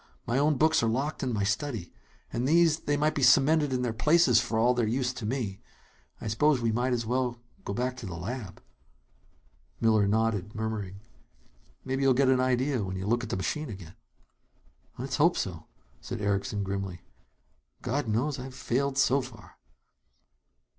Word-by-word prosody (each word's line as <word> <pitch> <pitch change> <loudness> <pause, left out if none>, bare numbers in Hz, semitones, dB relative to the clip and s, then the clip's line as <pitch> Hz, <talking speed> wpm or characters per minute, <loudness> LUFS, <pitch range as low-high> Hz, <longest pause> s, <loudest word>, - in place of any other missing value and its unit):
My 120 +3 0
own 150 0 +2
books 160 +3 +3
are 115 - +1
locked 135 +7 -2
in 130 - -1
my 105 -3 -1
study. 105 -1 -2 0.4
And 125 +2 -1
these 165 0 +4
they 145 -2 -1
might 150 +1 +1
be 145 - -2
cemented 145 +3 +5
in 125 -1 0
their 120 -2 -1
places, 150 0 +4
for 110 - -2
all 120 +3 +4
their 120 -3 0
use 125 +2 0
to 120 -4 -5
me. 110 -6 -3 0.6
I - - -6
suppose 135 +6 +2
we 115 -1 0
might 125 +3 0
as 120 -2 0
well 125 0 -1 0.3
go - - -3
back 125 +4 -2
to 115 - -7
the 90 - -6
lab." 105 +3 -6 1.2
Miller 110 -3 +3
nodded, 105 -1 0
murmuring: 105 -3 -4 0.8
"Maybe 135 +1 -2
you'll 135 -2 +4
get 135 0 +3
an 130 -1 +4
idea 130 -1 +1
when 95 -1 -4
you 95 - -4
look 120 +3 +1
at 115 - -6
the - - -2
machine 150 +10 -3
again." 95 -5 -9 1.0
"Let's 130 +3 -3
hope 165 +4 +4
so," 85 -4 -4 0.3
said - - -6
Erickson 100 0 -1
grimly. 95 -2 -4 0.8
"God 140 +1 -1
knows 130 +7 0
I've 130 0 -8
failed 135 +2 -1
so 135 +1 +3
far!" 125 -4 -12
125 Hz, 175 wpm, -28 LUFS, 105-135 Hz, 1.2 s, cemented